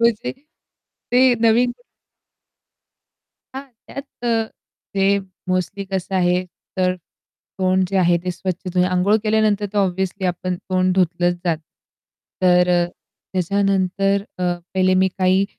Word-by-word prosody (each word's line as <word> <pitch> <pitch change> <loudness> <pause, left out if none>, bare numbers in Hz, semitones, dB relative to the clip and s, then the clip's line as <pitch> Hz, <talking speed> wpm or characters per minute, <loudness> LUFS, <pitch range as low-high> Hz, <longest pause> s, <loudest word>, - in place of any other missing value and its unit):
म्हणजे 235 +1 +1 0.8
ते 255 0 +5
नवीन 235 +2 +4 1.8
हां, 270 - -5 0.2
त्यात 275 - -7 0.2
अ, 230 -2 +2 0.5
ते 195 0 +3 0.3
मोस्टली 185 +2 -1
कसं 190 0 -4
आहे, 180 0 +2 0.3
तर 185 -1 +2 0.6
तोंड 185 0 +2
जे 195 - -1
आहे, 175 -1 +4
ते 180 - -1
स्वच्छ 185 +1 -4
तुम्ही 180 0 +3
अंघोळ 185 +3 +3
केल्यानंतर 215 -1 +2
तर 210 - 0
ऑब्व्हियसली 190 0 0
आपण 180 +1 -2
तोंड 185 0 0
धुतलंच 175 -1 +2
जातं. 165 -3 0 0.8
तर 180 -1 +5
अ, 175 -1 +3 0.5
त्याच्यानंतर 195 +1 +1 0.2
अ, - - -3 0.3
पहिले 185 0 +3
मी 190 - +3
काही 185 +1 +3
190 Hz, 125 wpm, -21 LUFS, 180-200 Hz, 1.8 s, ते